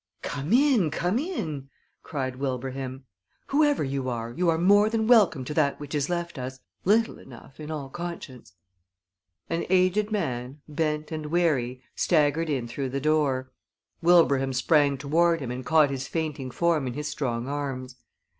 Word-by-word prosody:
"Come 145 Hz, +4 st, -4 dB
in, 250 Hz, -, +4 dB
come 180 Hz, +8 st, 0 dB
in!" 160 Hz, -, -4 dB, 0.3 s
cried 130 Hz, -4 st, -4 dB
Wilbraham. 130 Hz, 0 st, -4 dB, 0.4 s
"Whoever 290 Hz, -, +3 dB
you 135 Hz, -1 st, -2 dB
are, 115 Hz, -1 st, -4 dB
you 175 Hz, +8 st, 0 dB
are 160 Hz, -, +2 dB
more 205 Hz, +5 st, +5 dB
than 220 Hz, -1 st, 0 dB
welcome 205 Hz, -, +4 dB
to 150 Hz, -, -4 dB
that 145 Hz, -2 st, +1 dB
which 145 Hz, 0 st, -8 dB
is 145 Hz, 0 st, 0 dB
left 170 Hz, -3 st, -3 dB
us; 130 Hz, +1 st, -6 dB, 0.3 s
little 220 Hz, +4 st, +2 dB
enough 130 Hz, +2 st, -14 dB
in 150 Hz, 0 st, -7 dB
all 150 Hz, -3 st, -4 dB
conscience." 135 Hz, -, -8 dB, 0.9 s
An 165 Hz, 0 st, -1 dB
aged 190 Hz, +3 st, +2 dB
man, 135 Hz, -, -3 dB
bent 150 Hz, 0 st, -2 dB
and 155 Hz, -1 st, -4 dB
weary, 145 Hz, -7 st, 0 dB
staggered 155 Hz, 0 st, +2 dB
in 130 Hz, -5 st, -1 dB
through 130 Hz, +3 st, -4 dB
the 135 Hz, +2 st, -2 dB
door. 140 Hz, -3 st, +1 dB, 0.5 s
Wilbraham 140 Hz, -6 st, +4 dB
sprang 140 Hz, +1 st, +3 dB
toward 165 Hz, +5 st, +2 dB
him 130 Hz, -4 st, -4 dB
and 125 Hz, +1 st, -5 dB
caught 155 Hz, +1 st, +4 dB
his 135 Hz, 0 st, -4 dB
fainting 155 Hz, -5 st, -3 dB
form 160 Hz, 0 st, +1 dB
in 125 Hz, -, -3 dB
his 150 Hz, +2 st, -4 dB
strong 125 Hz, -5 st, -2 dB
arms. 135 Hz, -3 st, -4 dB
150 Hz, 160 wpm, -26 LUFS, 130-170 Hz, 0.9 s, more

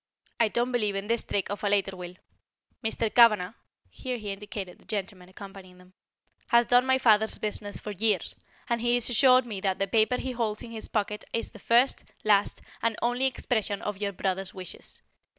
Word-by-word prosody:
I 230 Hz, -, +5 dB
don't 240 Hz, +3 st, -1 dB
believe 210 Hz, -5 st, 0 dB
in 195 Hz, 0 st, -3 dB
this 230 Hz, +2 st, 0 dB
trick 200 Hz, 0 st, -2 dB
of 205 Hz, -, -5 dB
a 205 Hz, -, +2 dB
later 200 Hz, -1 st, +1 dB
will. 180 Hz, -1 st, -8 dB, 0.7 s
Mr. 220 Hz, 0 st, -1 dB
Cavanagh" 215 Hz, -5 st, +5 dB, 0.4 s
here 255 Hz, -2 st, -4 dB
he 210 Hz, -3 st, -5 dB
indicated 195 Hz, -2 st, -7 dB
the -, -, -22 dB
gentleman 195 Hz, -3 st, -5 dB
accompanying 195 Hz, -1 st, -12 dB
them 180 Hz, 0 st, -19 dB, 0.5 s
"has 235 Hz, 0 st, +4 dB
done 245 Hz, +2 st, +4 dB
my 260 Hz, 0 st, +4 dB
father's 220 Hz, -4 st, +3 dB
business 205 Hz, -1 st, -4 dB
for 210 Hz, -, -6 dB
years, 205 Hz, -2 st, 0 dB, 0.3 s
and 235 Hz, -1 st, -1 dB
he 240 Hz, +1 st, +3 dB
assured 255 Hz, +2 st, +4 dB
me 210 Hz, -5 st, -6 dB
that 190 Hz, -1 st, 0 dB
the 195 Hz, -, 0 dB
paper 220 Hz, +5 st, +2 dB
he 260 Hz, -, -3 dB
holds 225 Hz, -4 st, -2 dB
in 230 Hz, -, -9 dB
his 220 Hz, -1 st, -4 dB
pocket 210 Hz, -1 st, -2 dB
is 230 Hz, -, -2 dB
the -, -, -13 dB
first, 240 Hz, +3 st, +3 dB, 0.2 s
last, 205 Hz, -2 st, +2 dB, 0.2 s
and 230 Hz, -1 st, +1 dB
only 245 Hz, +2 st, +2 dB
expression 220 Hz, -6 st, -1 dB
of 205 Hz, -2 st, -4 dB
your 200 Hz, -1 st, -1 dB
brother's 190 Hz, 0 st, -3 dB
wishes. 185 Hz, -1 st, -8 dB
210 Hz, 190 wpm, -27 LUFS, 195-235 Hz, 0.7 s, I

